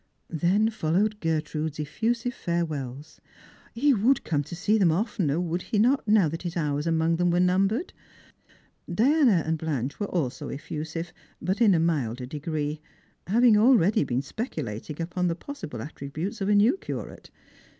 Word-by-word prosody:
Then 185 +7 +2
followed 210 +2 0
Gertrude's 155 -2 -2
effusive 230 +11 -1
fiirewells. 155 - -4 0.6
He 280 +4 +4
would 240 +4 +2
come 145 -3 0
to 170 - -7
see 210 +5 +1
them 180 -5 +4
oftener, 180 - 0
would 175 0 -2
he 215 - -2
not, 245 +4 +3
now 210 -5 +5
that 165 +2 -4
his 175 -1 -4
hours 150 -1 -1
among 165 0 +2
them 175 0 +2
were 175 +1 +2
numbered 195 - +1 0.9
P - - -5
Diana 245 - +4
and 160 0 -1
Blanche 145 -5 -3
were 205 - -1
also 145 -8 -2
efiusive, 160 +3 -5 0.3
but 190 +5 -2
in 205 -5 +6
a - - +2
milder 135 -7 -1
degree, 150 +2 -4 0.5
having 230 +3 +5
already 215 - +4
been 130 -1 -1
speculating 150 - -5
upon 180 +2 -1
the 165 - 0
possible 165 - -7
attributes 155 +7 -6
of 195 - 0
a 210 - +4
new 220 - +4
curate. - - -7
170 Hz, 160 wpm, -26 LUFS, 155-210 Hz, 0.9 s, in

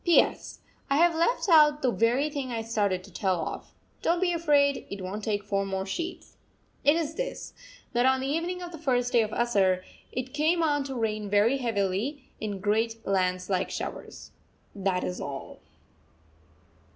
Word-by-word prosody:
P.S. 345 -2 +2 0.3
I 275 - +3
have 340 +1 +5
left 340 +9 +1
out 300 -4 +6
the 255 - +3
very 240 +6 +2
thing 275 -3 -4
I 225 -1 -2
started 205 -5 0
to 195 - -14
tell 185 -3 0
of. - - -7 0.3
Don't 340 +1 +2
be 355 -1 +2
afraid, 290 -4 +2
it 200 -1 -6
won't 200 +3 -5
take 205 -1 -1
four 200 -1 0
more 190 -1 -3
sheets. 335 - -5 0.5
It 290 +2 +5
is 320 -2 -1
this, - - -5 0.4
that 240 +2 +3
on 265 0 +3
the 260 - -3
evening 340 +5 -2
of 350 - -7
the 330 - -9
first 250 -5 +1
day 235 - +6
of 215 - -1
Asarh 195 -6 +2 0.3
it 255 0 -4
came 320 +3 +2
on 290 -2 +2
to 270 -1 -5
rain 215 -3 -2
very 210 +6 +3
heavily, 225 +4 -1 0.2
in 205 -2 -4
great 225 +3 0
lance 185 -1 0
like 185 -2 0
showers. - - -6 0.4
That 190 -2 0
is 180 - -3
all. 135 -1 -7
240 Hz, 175 wpm, -28 LUFS, 200-295 Hz, 0.5 s, out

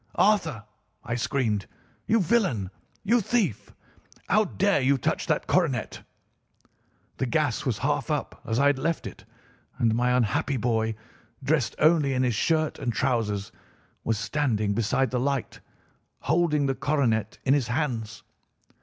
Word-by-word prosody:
"'Arthur!' 165 - +2 0.4
I 120 - -4
screamed, 115 -4 -1 0.4
'you 225 0 +3
villain! 175 - +1 0.3
you 235 +4 +3
thief! 195 - -1 0.6
How 215 +3 +3
dare 200 -3 +1
you 135 +2 +3
touch - - -1
that - - 0
coronet?' 150 -11 0 1.2
"The - - -1
gas - - 0
was - - 0
half - - -1
up, - - -3
as 115 +1 -2
I 140 - +3
had 145 -2 +3
left 165 +3 -1
it, - - -9 0.5
and 115 -1 +2
my 125 +2 +2
unhappy 125 +4 0
boy, 115 -2 0 0.5
dressed 135 -4 +1
only 155 -3 +3
in 130 - +1
his 125 -2 +1
shirt 155 +7 0
and 130 -4 -1
trousers, 110 -5 -1 0.5
was 115 -1 0
standing 110 -5 0
beside 115 +5 0
the 125 - 0
light, 135 0 -2 0.6
holding 150 -1 +2
the 135 - +1
coronet 130 -7 0
in 135 - +4
his 140 -5 +1
hands. 120 -5 -3
130 Hz, 145 wpm, -26 LUFS, 115-155 Hz, 1.2 s, in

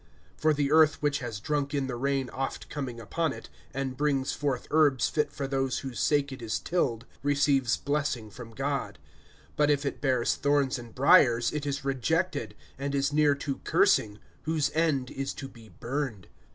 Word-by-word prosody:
(7)For 155 0 +4
the 140 -1 0
earth 155 0 +5
which 145 -1 +1
has 120 -5 -5
drunk 145 +4 -1
in 140 -1 0
the 130 -2 -4
rain 135 +1 0
oft 135 0 -4
coming 130 -5 -4
upon 160 +8 -1
it, - - -9 0.2
and 135 -1 -3
brings 140 -2 0
forth 140 -4 -2
herbs 150 -5 +4
fit 150 -2 0
for 140 - -4
those 135 -1 0
for 135 - -4
whose 120 - -7
sake 145 -1 +2
it 130 - -8
is 115 -2 -1
tilled, 125 -10 -1 0.2
receives 140 -3 +2
blessing 140 -7 -2
from 120 +1 -10
God; 135 -5 -3 0.6
(8)but 150 0 +4
if 145 -1 +2
it 140 - -3
bears 130 -4 +2
thorns 140 -2 +1
and 120 -1 -11
briers 130 -4 +5
it 150 -1 -3
is 140 -1 -3
rejected, 140 - -1 0.2
and 140 0 -2
is 140 +1 +1
near 150 -1 +4
to 140 -1 -4
cursing; 105 -1 +2 0.3
whose 155 -2 +1
end 155 -6 +1
is 135 0 -4
to 135 - -6
be 115 -4 -15
burned. 120 - -4
140 Hz, 185 wpm, -28 LUFS, 125-145 Hz, 0.6 s, earth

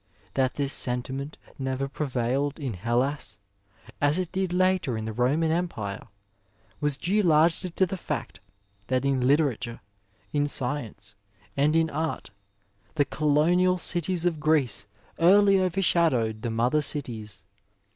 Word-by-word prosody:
That 130 -1 +1
this 140 -1 -1
sentiment 130 +3 -2 0.2
never 130 0 -2
prevailed 135 +1 -2
in 135 -6 -3
Hellas, 120 +9 -1 0.6
as 145 +3 +3
it 185 -2 -2
did 190 -1 -1
later 185 -8 +1
in 110 - -4
the 110 - -4
Roman 140 +8 +1
Empire, 140 - -3 0.7
was 145 -2 0
due 195 +9 +1
largely 170 +1 +3
to 190 +2 +1
the 190 +1 -5
fact - - -5 0.5
that 130 +1 0
in 135 -2 +1
literature, 125 -3 +1 0.5
in 145 0 +2
science 125 -7 -3 0.4
and 145 +3 +2
in 165 -1 +2
art, 155 -6 -3 0.6
the 145 -2 +3
colonial 165 +6 +2
cities 175 0 -1
of 165 -3 0
Greece 135 -10 +1 0.3
eariy 195 +3 +6
over 185 +1 0
shadowed 125 -12 +2
the 120 - -2
mother 120 +7 +1
cities. 120 -8 -3
145 Hz, 135 wpm, -26 LUFS, 125-170 Hz, 0.7 s, eariy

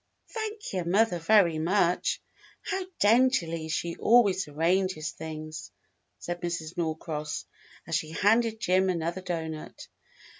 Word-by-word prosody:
"Thank 435 - -5
your 180 -3 -1
mother 195 +1 +2
very 170 -3 +4
much. 175 +1 +1 0.4
How 380 -1 -3
daintily 205 -8 +3
she 170 +1 -2
always 205 -6 +4
arranges 165 +2 0
things," 155 0 -7 0.5
said 175 +9 -5
Mrs. 170 -1 -4
Norcross, 160 -2 -3 0.4
as - - -7
she 155 - -4
handed 220 +6 +2
Jim 185 -2 +2
another 170 +1 -2
doughnut. 160 -3 -5
175 Hz, 115 wpm, -28 LUFS, 160-205 Hz, 0.5 s, very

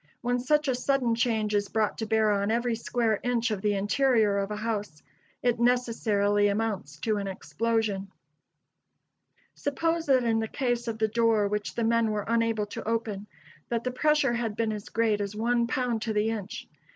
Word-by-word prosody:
When 245 0 0
such 300 +4 +1
a 260 - +2
sudden 250 -1 +1
change 225 -2 0
is 205 -1 +1
brought 215 0 0
to 220 - -2
bear 220 -1 +3
on 200 0 0
every 235 +1 +1
square 230 -2 0
inch 240 -1 0
of 205 -3 -2
the 205 0 +1
interior 210 0 +2
of 195 0 -2
a 210 - -3
house, 210 -7 -4 0.4
it 245 -2 +2
necessarily 220 -4 +2
amounts 200 -8 -2
to 215 -2 0
an 200 -1 -3
explosion. 205 0 -2 1.4
Suppose 325 +3 -1
that 260 -2 +4
in 225 -1 +2
the 220 - -1
case 240 -1 -1
of 225 -1 -2
the 220 0 +2
door 225 -1 +2
which 210 0 -3
the 235 - -1
men 230 0 +2
were 210 -1 -2
unable 230 -2 +1
to 205 - -7
open, 215 -3 -2 0.4
that 235 -1 -1
the 255 - -1
pressure 295 -1 +2
had 235 -3 -2
been 225 -1 0
as 210 -1 -7
great 220 -2 +1
as 200 +1 -4
one 235 +2 +1
pound 245 -2 -1
to 225 -1 -2
the 210 +1 +1
inch. 210 -2 -6
225 Hz, 190 wpm, -27 LUFS, 210-240 Hz, 1.4 s, that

